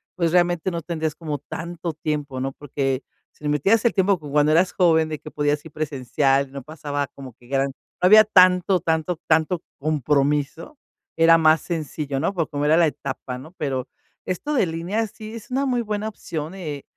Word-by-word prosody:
pues, 170 -3 +1
realmente 175 0 +2
no 170 -1 -3
tendrías 160 -2 -3
como 150 -3 -4
tanto 170 +3 -6
tiempo, 150 -3 -3
¿no? 135 +1 -3
Porque 135 -2 -2 0.3
si 150 - -7
metías 195 +10 +2
el 235 - +4
tiempo 195 -1 +2
como 150 -2 -9
cuando 150 +1 +4
eras 175 +4 +3
joven 160 -3 +3
de 155 - -3
que 155 - -10
podías 145 0 0
ir 160 - -10
presencial, 140 -2 0
no 140 -1 -7
pasaba 145 -1 -4
como 130 -2 -11
que 120 - -19
gran 135 +1 +1
no 135 +6 -6
había 215 +3 +9
tanto, 185 -2 +5
tanto, 160 +1 -1
tanto 160 +2 +2 0.2
compromiso, 150 - 0 0.4
era 165 0 +6
más 160 0 +5
sencillo, 150 -4 -3
¿no?, 195 - 0
porque 165 -5 -1
como 145 0 -1
era 155 +2 +5
la 170 -1 +5
etapa, 135 -3 -5
¿no? 150 +7 -12
Pero 135 -4 -2 0.4
esto 185 - -3
de 255 - +3
línea 175 +7 -2
sí 215 +1 -10
es 225 - -10
una 265 +2 0
muy 250 -3 +1
buena 210 -1 -3
opción, 160 -6 -6
eh, 150 -7 -6
155 Hz, 190 wpm, -23 LUFS, 145-180 Hz, 0.4 s, había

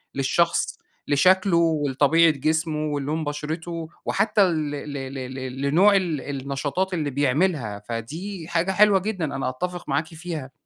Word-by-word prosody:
للشخص، 170 +5 +1 0.3
لشكله 185 +4 +4
ولطبيعة 160 0 +3
جسمه 155 +2 -1
ولون 150 +3 -2
بشرته 160 +2 -4 0.2
وحتى 215 -1 +2
ل 155 -5 0
ل 145 0 -6
ل 135 0 -5 0.2
ل 130 0 -6
لنوع 180 +9 +4
ال 170 -8 0 0.2
النشاطات 140 +7 -2
اللي 150 -4 -1
بيعملها، 140 - 0
فدي 155 - -6
حاجة 175 +3 0
حلوة 205 0 +5
جدًا، 195 -4 -2
أنا 135 -1 -1
أتفق 175 +7 -5
معاكِ 160 - 0
فيها. 160 -5 -6
155 Hz, 135 wpm, -24 LUFS, 140-175 Hz, 0.3 s, حلوة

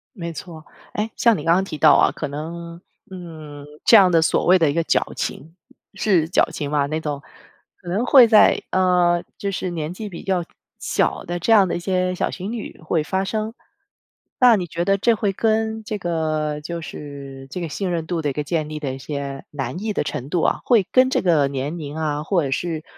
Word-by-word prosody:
没 170 -4 -5
错。 160 0 -9 0.3
哎， 215 +2 -2
像 230 -3 +3
你 150 - -6
刚 165 - +4
刚 185 +2 +2
提 175 -5 -6
到 - - +6
啊， - - +4
可 150 - -5
能， 170 +4 -7 0.3
嗯， 155 -5 -9 0.2
这 230 - +7
样 185 -3 +6
的 165 -1 +4
所 - - +1
谓 185 +1 +6
的 160 -4 +3
一 - - 0
个 165 0 +1
矫情， 160 +1 -2 0.4
是 180 -7 +2
矫情 150 -3 0
吧 145 -2 +2
那 155 +2 -2
种， 145 -2 -4 0.6
可 180 - -18
能 210 +8 0
会 255 -4 +8
在， 220 -2 +5
呃， 180 -2 +3
就 200 - -3
是 185 -1 -3
年 165 0 -4
纪 210 +2 -7
比 170 - -9
较 185 -3 0 0.4
小 - - 0
的 175 +1 -3
这 225 +7 +3
样 200 -4 +6
的 - - -2
一 - - -2
些 185 0 -1
小 - - -1
情 195 +3 -5
侣 230 -3 -7
会 160 0 0
发 190 +4 -1
生。 215 +2 -3 0.9
那 245 -3 +7
你 180 -3 -2
觉 170 +2 -3
得 195 0 +3
这 235 +4 +3
会 205 -2 -1
跟 220 +1 0
这 215 -1 -4
个 155 -4 -2
就 170 +2 -5
是， 140 -3 -9
这 180 - -4
个 170 - -3
信 185 +5 -3
任 165 -2 -2
度 170 -2 -2
的 150 - -1
一 140 - -3
个 150 - -3
建 155 -1 -2
立 155 - -5
的 140 -3 -3
一 - - -6
些 140 -1 -5
难 135 +5 -4
易 220 - -1
的 - - -1
程 140 -2 -5
度 170 +1 0
啊， - - +1
会 225 -7 +3
跟 255 0 +5
这 - - +1
个 160 -6 +3
年 140 +4 -4
龄 150 -2 -7
啊， 150 -1 -2
或 175 -1 +1
者 - - -3
是， 160 +1 -2
170 Hz, 245 characters per minute, -21 LUFS, 150-190 Hz, 0.9 s, 会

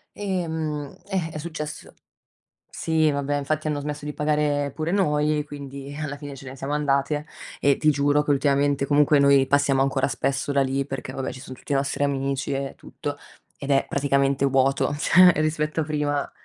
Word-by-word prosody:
uhm, 160 -7 -3
eh, 185 -5 -1
è 155 - -6
successo 150 -1 -6 0.8
Sì, 160 -2 +1
vabbè 140 0 -1
infatti 155 +2 -2
hanno 145 -1 -1
smesso 150 0 -5
di 150 - -4
pagare 150 -1 0
pure 160 +1 -2
noi, 150 -5 +1
quindi 140 -1 -8
alla 150 -2 -3
fine 145 -1 -8
ce 135 - -11
ne 130 - -8
siamo 135 +1 -5
andate, 145 0 0 0.3
e 140 -1 +3
ti 155 - +3
giuro 145 +1 +2
che 145 - 0
ultimamente 140 0 +2
comunque 145 +1 +4
noi 140 -1 +5
passiamo 140 -1 +3
ancora 135 0 +1
spesso 135 +1 -1
da 140 - +3
lì 135 +1 0
perché 135 -2 -6
vabbè, 135 - -4
ci 130 - -10
son 130 -2 -9
tutti 140 - -5
i - - +2
nostri 140 +1 0
amici 140 0 -1
e 135 0 -3
tutto, 145 0 -6 0.4
ed 140 0 -4
è 135 0 +3
praticamente 140 -1 +1
vuoto, 135 +1 +2
cioè 180 +4 +6
rispetto 155 0 0
a - - 0
prima 145 -1 -1
145 Hz, 180 wpm, -24 LUFS, 140-150 Hz, 0.8 s, cioè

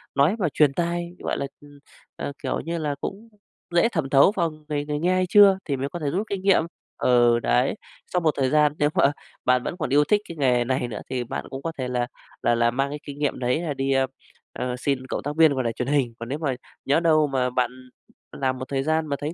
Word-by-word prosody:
nói 145 +9 +4
mà 180 - +1
truyền 145 -3 +4
tai, 170 +1 -1
gọi - - -2
là, 140 - -2 0.2
ừm, 145 -1 -16 0.4
à, - - -4
kiểu 130 - -1
như 170 +1 -3
là, 150 -3 -2
cũng 220 +4 -6 0.5
dễ 200 +7 +5
thẩm 160 - -2
thấu 140 +8 +6
vào 170 -3 +1
người 150 -1 -5
người 150 0 -2
nghe 180 +3 +2
hay 185 0 +2
chưa 200 -2 +7
thì 140 -3 -1
mới 135 +2 -3
có 175 - -6
thể 145 -3 -1
rút 200 +8 -2
kinh 195 -2 -3
nghiệm. 195 -4 +4 0.3
Ừ, 120 -1 +4
đấy, - - +1 0.4
sau 180 - +3
một 160 -3 +2
thời 130 -1 +2
gian 150 -1 +3
nếu 145 - +3
mà 140 - +4 0.3
bạn 125 0 +3
vẫn 175 - -4
còn 150 -6 -2
yêu 145 +2 +5
thích 210 +5 +2
cái 165 - -7
nghề 125 -3 +3
này 130 0 -1
nữa 105 -3 -6
thì 125 -2 -2
bạn - - -5
cũng 135 - -6
có 165 - -3
thể 130 -1 -2
là 125 -1 -1 0.3
là 120 - +2
là 120 0 +2
mang 135 +3 0
cái 145 +1 -5
kinh 145 0 -9
nghiệm 145 -2 -1
đấy 125 +5 0
là 160 -4 -2
đi, 135 0 -1
ơ, 135 0 +3 0.5
ơ, 125 0 -3
xin 130 -1 -1
cộng - - -3
tác 145 +1 -3
viên 160 -3 +6
vào 130 -2 -1
đài 115 -1 -1
truyền 125 - -3
hình. 135 -5 +1
Còn 115 +1 -6
nếu 145 - -3
mà 140 -5 -1 0.3
nhỡ 145 +4 +3
đâu 155 -3 +3
mà 130 -2 0
bạn 125 -1 0 0.6
làm 130 -2 -1
một 130 - -5
thời 135 -1 -1
gian 155 +1 0
mà 140 - -1
thấy 150 +3 -3
145 Hz, 260 wpm, -24 LUFS, 130-160 Hz, 0.6 s, chưa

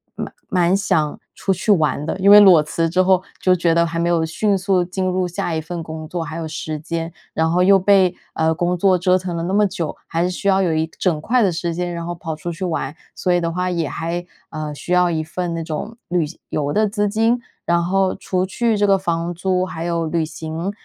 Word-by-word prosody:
蛮 - - -6 0.2
蛮 180 +1 +3
想 160 -7 0 0.2
出 195 - 0
去 190 +4 0
玩 155 -6 +2
的。 165 - -3
因 195 +1 +4
为 210 - +11
裸 185 -6 +7
辞 165 +2 -1
之 185 +3 +2
后 185 -1 +3 0.2
就 185 - +4
觉 170 -1 +2
得 170 0 +4
还 165 0 -3
没 170 +1 +1
有 165 -2 +2
迅 200 +5 0
速 190 -1 +1
进 185 +1 -3
入 185 0 0
下 175 -1 -3
一 160 - -1
份 165 +1 -6
工 160 -1 -7
作， 175 +1 -3
还 160 +1 -6
有 165 -1 -4
时 155 0 -5
间， 165 +1 -4 0.2
然 160 0 +1
后 180 +2 +2
又 195 +1 +6
被， 190 -2 +4 0.2
呃， 160 0 +1
工 175 +1 0
作 185 +1 +3
折 180 +1 +3
腾 180 -2 -4
了 165 - -3
那 180 +3 -2
么 210 0 +4
久， 170 -4 -4
还 165 +1 -1
是 180 - +1
需 200 - -4
要 195 0 +4
有 175 -4 +1
一 160 0 0
整 170 -5 +1
块 240 +7 +2
的 195 - +3
时 170 0 -3
间， 175 0 -2
然 170 0 -4
后 175 0 -4
跑 165 -1 -5
出 170 +3 -5
去 175 +3 -6
玩。 160 -4 -3 0.2
所 180 - -1
以 175 - +2
的 170 0 -1
话， 180 +2 -1
也 170 -3 -1
还 175 +2 -3 0.2
呃 155 -1 -5
需 175 - -4
要 180 -1 +4
1 160 -1 -1
份 170 +2 -4
那 165 0 -3
种 165 +8 -5
旅 175 -2 +1
行 150 - -11
游 145 -1 -1
的 215 0 +3
资 205 0 0
金， 225 +3 +2 0.3
然 170 0 +2
后 190 +1 +1
除 185 -1 -1
去 225 +3 0
这 205 0 +2
个 195 -1 +5
房 170 -2 -2
租 185 +1 0
还 165 -3 -6
有 170 -1 -1
旅 165 +1 0
行， 160 +4 -5
175 Hz, 265 characters per minute, -20 LUFS, 165-185 Hz, 0.3 s, 为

